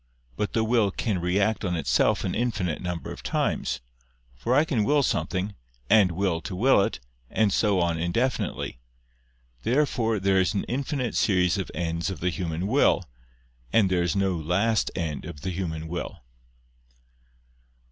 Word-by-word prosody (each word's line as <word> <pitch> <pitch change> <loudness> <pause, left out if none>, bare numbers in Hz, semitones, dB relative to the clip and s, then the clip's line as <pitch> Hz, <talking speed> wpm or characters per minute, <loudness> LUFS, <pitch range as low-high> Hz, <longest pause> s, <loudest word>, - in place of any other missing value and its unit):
But 105 - -2
the 110 - +2
will 110 -2 +3
can 100 0 -2
react 100 +5 +1
on 90 -3 0
itself 80 -4 +2
an - - -1
infinite 105 -9 -1
number 90 -3 -4
of - - -8
times: - - -1 0.5
for 120 - 0
I 150 +3 +5
can 125 -9 +1
will 145 +5 +3
something, 90 +1 -1 0.4
and 100 -5 +6
will 90 -2 0
to 95 - -6
will 120 +2 +4
it, - - -1 0.3
and 105 -3 +2
so 105 -4 +2
on 85 -2 +1
indefinitely. 85 - -1 0.8
Therefore 115 - +1
there 95 0 +3
is 95 - 0
an 100 - 0
infinite 130 -1 -2
series 90 -1 +2
of 95 - -3
ends 85 +1 -2
of 95 - -5
the 90 +1 0
human 85 -1 -3
will, 120 -2 +3 0.7
and 100 -4 +4
there 90 -1 +2
is 85 +2 0
no 95 -2 +1
last 90 +8 +1
end 80 -3 -3
of 70 - -8
the 95 - -3
human 80 -3 -4
will. 85 -6 -5
95 Hz, 160 wpm, -26 LUFS, 85-110 Hz, 0.8 s, and